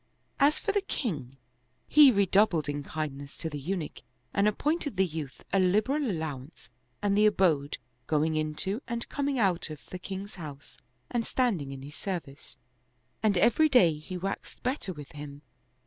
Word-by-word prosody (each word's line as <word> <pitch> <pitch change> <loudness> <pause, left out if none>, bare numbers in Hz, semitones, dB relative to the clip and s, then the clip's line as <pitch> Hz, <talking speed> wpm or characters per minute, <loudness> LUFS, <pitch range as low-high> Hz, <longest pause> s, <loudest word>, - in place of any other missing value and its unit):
As 290 +2 +5
for 410 - -1
the 405 0 +1
king, 145 - -4 0.5
he 295 -3 +8
redoubled 195 - +3
in 145 0 -2
kindness 145 -2 -5
to 160 - -4
the 145 - -4
Eunuch 165 +2 -4 0.3
and 200 +1 +3
appointed 290 - 0
the 190 - +4
youth 155 -5 -6
a 195 - +5
liberal 215 +10 +2
allowance 155 - -5 0.3
and 200 -1 +2
the 210 +1 +6
abode 165 -9 +2 0.3
going 155 +1 +2
in 155 0 -1
to 200 - -1
and 235 -1 -3
coming 280 -1 -1
out 190 -7 +1
of 155 -2 -7
the 185 - -5
king's 195 +2 -6
house 145 -3 -9 0.3
and 240 -1 +1
standing 195 - 0
in 135 -1 -7
his 145 +2 -9
service, 170 -8 -6 0.6
and 210 -4 +3
every 240 - +5
day 185 - +6
he 155 +5 -7
waxed 195 +2 -5
better 255 -6 -1
with 150 -5 -9
him. 145 0 -9
185 Hz, 165 wpm, -29 LUFS, 150-220 Hz, 0.6 s, he